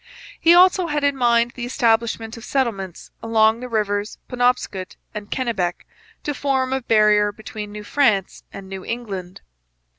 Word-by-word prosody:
He 335 +1 +6
also 365 0 +5
had 295 -2 -1
in 285 -1 +2
mind 235 -2 +2
the 245 - -7
establishment 230 -2 0
of 230 - -11
settlements 210 - -3
along 220 0 +3
the 250 0 -7
rivers 205 -2 -1
Penobscot 245 -7 -1 0.2
and 210 -1 -7
Kennebec, 200 -9 -2 0.4
to 295 - -2
form 265 -1 0
a 265 - -1
barrier 210 -3 +4
between 210 0 -8
New 210 0 -8
France 210 -7 +1
and 195 -1 -9
New 190 -1 -7
England. 195 -7 -6
225 Hz, 150 wpm, -21 LUFS, 205-255 Hz, 0.4 s, He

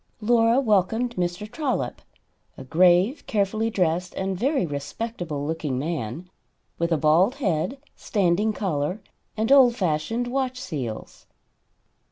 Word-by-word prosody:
Laura 230 +2 +3
welcomed 225 +1 +1
Mr. 175 +3 -2
Trollop, 245 - -3 0.6
a - - -8
grave, 180 - +3
carefully 215 +2 0
dressed 180 -3 -1
and 190 0 -2
very 260 - +1
respectable 150 +1 -4
looking 155 -4 -2
man, 155 +1 -4 0.5
with 170 0 0
a 165 - +3
bald 165 - +3
head, 215 - -1 0.2
standing 200 +1 +1
collar 180 -3 -2 0.4
and 220 +4 0
old 260 -4 +7
fashioned 185 +6 -1
watch 255 0 -2
seals. 140 - -6
185 Hz, 120 wpm, -24 LUFS, 160-230 Hz, 0.6 s, old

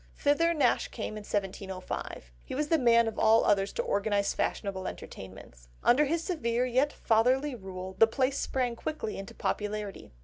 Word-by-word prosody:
Thither 315 +4 +3
Nash 290 -7 +2
came 215 -2 -5
in 215 - -6
1705. 190 - -4
He - - -6
was 300 +2 -1
the 325 - +3
man 235 -2 +5
of 225 - -4
all 225 +1 +5
others 195 -1 +2
to - - -1
organise 200 0 0
fashionable 190 -2 -2
entertainments. 95 -11 -10 0.2
Under 280 +5 +5
his 330 +3 -1
severe, 245 - 0
yet 260 +4 +2
fatherly 255 +6 +2
rule, 190 -4 -7
the 225 - +8
place 265 +4 0
sprang 250 -3 -1
quickly 300 -4 -4
into 195 - -9
popularity. 210 -1 -3
225 Hz, 165 wpm, -29 LUFS, 200-265 Hz, 0.2 s, the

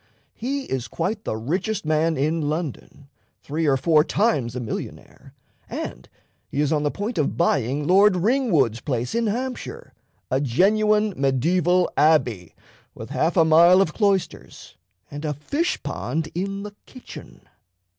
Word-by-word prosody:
He 275 +4 -3
is 130 - -4
quite 205 +6 -3
the 110 - -2
richest 180 - -2
man 155 +1 +1
in 150 +2 0
London, 150 -3 -5 0.4
three 155 +2 -2
or 135 -2 +3
four 150 +3 +4
times 145 - 0
a - - -3
millionaire, 115 -3 -8 0.3
and - - -6 0.4
he 140 - -4
is 150 +1 +2
on 150 - +1
the 145 - 0
point 205 +5 -4
of 150 - -1
buying 140 -3 +1
Lord 195 +3 +5
Ringwood's 175 - +1
place 125 -4 -3
in 230 -1 0
Hampshire 250 +4 -5 0.4
a 130 +1 +1
genuine 210 - +2
mediaeval 170 +7 +2
abbey, 125 - +2 0.4
with - - -9
half 165 +4 0
a 165 - +6
mile 170 +3 +6
of 170 -6 +1
cloisters 200 -4 -2 0.4
and 145 +1 -7
a 150 -2 -2
fish 285 - -2
pond 145 +2 -3
in 195 +3 -3
the 210 0 -8
kitchen." 255 - -12
160 Hz, 145 wpm, -23 LUFS, 140-200 Hz, 0.4 s, a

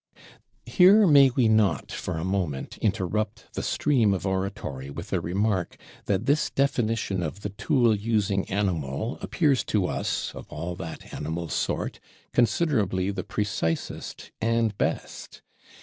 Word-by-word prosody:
Here 200 +3 +6
may 140 -5 +7
we 125 -2 +2
not, 105 - +2
for 90 -3 -4
a 80 - -3
moment, 90 -8 -2
interrupt 105 +1 -2
the - - -3
stream 120 -9 +2
of 90 0 -5
Oratory 95 -8 -3
with 70 - -7
a - - +1
remark, 95 +1 -1 0.3
that 95 -2 0
this 145 +2 +2
Definition 115 -8 0
of 85 +4 -4
the 105 - -3
Tool 115 +3 +2
using 105 -2 0
Animal 95 - -2
appears 145 -6 +1
to 100 -4 +1
us, - - -2
of - - -9
all 90 +1 -5
that 80 -1 -8
Animal 80 +2 -4
sort, - - -2 0.3
considerably 110 - +2
the 95 -2 -4
precisest 100 -6 -3
and 115 -2 +1
best? - - -3
100 Hz, 135 wpm, -26 LUFS, 90-115 Hz, 0.3 s, may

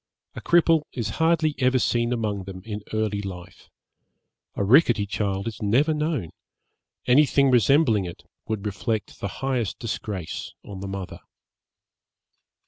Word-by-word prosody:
A - - -8
cripple 165 -2 +4
is 115 -4 -3
hardly 160 -2 +3
ever 130 0 +3
seen 120 -1 +1
among 105 -5 -2
them 95 -1 -9
in 105 -2 -5
early 110 -2 -1
life. 90 -3 -9 0.9
A - - -1
rickety 115 -2 +5
child 100 0 -2
is 110 -3 -6
never 130 +10 +3
known; 150 - -2 0.7
anything 140 +1 +4
resembling 120 - +4
it 85 - -9 0.2
would 110 -2 -3
reflect 105 +2 -3
the - - -2 0.2
highest 125 -6 -1
disgrace 105 -6 -5
on 100 -2 -8
the 100 - -5
mother. 95 -1 -6
110 Hz, 135 wpm, -24 LUFS, 100-135 Hz, 0.9 s, rickety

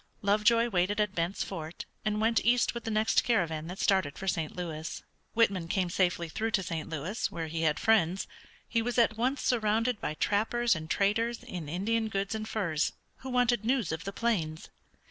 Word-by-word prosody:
Lovejoy 215 +4 +4
waited 195 +1 +1
at 210 -2 +1
Bent's 170 +2 -1
Fort, 160 +1 -6 0.2
and 210 0 0
went 225 +1 +2
east 240 0 +3
with 235 -1 -6
the - - -2
next 215 0 +3
caravan 165 -9 0
that 180 +2 -6
started 190 -9 +1
for 195 - -6
St. 165 -4 -1
Louis. 165 -3 -5 0.3
Whitman 200 -7 +2
came 180 0 0
safely 175 -2 +1
through 220 +8 -2
to 195 - -4
St. 165 -3 -4
Louis, 165 +8 -2
where 165 - -3
he 160 +1 -3
had 155 -2 +2
friends. 195 -5 +3 0.4
He 230 - +1
was 240 +1 -2
at 230 -2 +4
once 255 +5 0
surrounded 225 0 +1
by 155 - -2
trappers 225 +6 +2
and 155 0 -6
traders 225 +5 +1
in 170 -5 -6
Indian 220 +7 0
goods 200 -1 -2
and 220 0 -4
furs 170 -8 0 0.2
who 265 - -8
wanted 245 -3 +2
news 235 -6 +1
of 160 0 -4
the 195 - -3
plains. 190 -8 -1
200 Hz, 190 wpm, -30 LUFS, 170-230 Hz, 0.4 s, Lovejoy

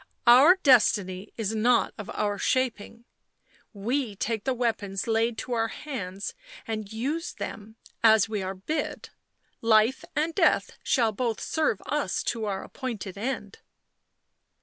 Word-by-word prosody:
" - - -47
Our 260 +9 +8
destiny 205 -7 +3
is 220 -2 -2
not 235 +2 +2
of 210 - -8
our 205 -1 -1
shaping;— 235 -2 -1 0.7
we 230 +2 -2
take 220 +1 -2
the 265 - +1
weapons 220 -5 -1
laid 225 0 +1
to 255 - -6
our 225 -1 +1
hands 200 -9 -6 0.3
and 215 -2 -4
used 285 +10 -3
them 220 +1 -7 0.3
as 220 -2 +6
we 215 -2 -3
are 190 +1 -4
bid. 295 +11 -4 0.5
Life 225 +2 +3
and 320 +2 0
death 395 - +2
shall 230 -5 +2
both 225 +1 -2
serve 305 -10 -1
us 300 0 -1
to 225 -2 -4
our 195 -2 -3
appointed 225 -8 -6
end." 210 -2 -4
225 Hz, 140 wpm, -27 LUFS, 205-255 Hz, 0.7 s, Our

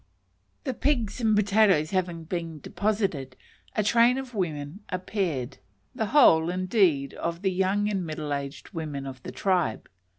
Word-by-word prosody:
The 265 - -2
pigs 250 -4 0
and 220 -2 +3
potatoes 200 -6 +3
having 175 -3 -1
been 165 -2 -4
deposited, 195 -11 -2 0.4
a 215 - +2
train 235 +4 +4
of 265 -2 -6
women 160 -4 -3
appeared 180 - -2 0.3
the 225 -4 -2
whole, 165 - +6
indeed, 180 - +2
of 170 +2 -4
the 190 - +2
young 190 +3 +1
and 195 -3 -1
middle 155 -2 -4
aged 140 +1 -5
women 150 -5 -4
of 130 -2 -8
the - - -7
tribe. 180 - 0
185 Hz, 145 wpm, -27 LUFS, 155-210 Hz, 0.4 s, whole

